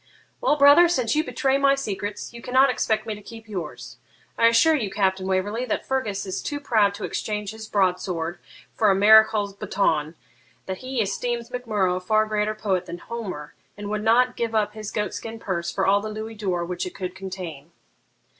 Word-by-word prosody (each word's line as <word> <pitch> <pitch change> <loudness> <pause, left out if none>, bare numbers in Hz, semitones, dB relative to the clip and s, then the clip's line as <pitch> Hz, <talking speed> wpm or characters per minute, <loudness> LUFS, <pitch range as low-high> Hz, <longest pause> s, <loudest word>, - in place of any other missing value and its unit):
'Well, - - +3
brother, 290 +4 +7
since 255 -7 0
you 310 - +2
betray 275 -4 0
my 275 0 +4
secrets, 205 -4 -5
you 235 - -9
cannot 260 +2 +4
expect 220 -2 0
me 220 - -3
to 210 - -10
keep 225 +2 -12
yours. 195 -5 -7 0.4
I 230 - +5
assure 230 +8 +5
you, 235 -10 0
Captain 190 -1 0
Waverley, 200 +5 -1
that 225 - -2
Fergus 220 -8 -2
is 190 - -4
too 290 -1 -4
proud 215 -7 +2
to - - -8
exchange 210 -2 -3
his 220 0 -9
broadsword 180 -4 -1 0.3
for 215 - +3
a 195 - +4
marechal's 215 0 +5
baton, 160 -6 0 0.5
that 190 -1 -4
he 255 -2 -2
esteems 235 +3 -3
Mac 250 -1 -5
Murrough 190 -4 +1
a - - -3
far 215 +3 +2
greater 215 0 -1
poet 195 -4 -1
than 170 0 -6
Homer, 185 -9 -7 0.2
and 205 0 -6
would 215 0 -2
not 245 +3 +3
give 230 -1 -2
up 210 -1 +1
his 215 -1 -6
goat 210 -2 -2
skin 225 0 -6
purse 175 -6 -3
for 190 - -1
all 200 +1 +4
the 215 - -5
louis 215 +1 -6
d'or 185 -5 -2
which 180 +1 -3
it - - -9
could 185 -1 -5
contain.' 185 -6 -8
210 Hz, 200 wpm, -24 LUFS, 190-230 Hz, 0.5 s, brother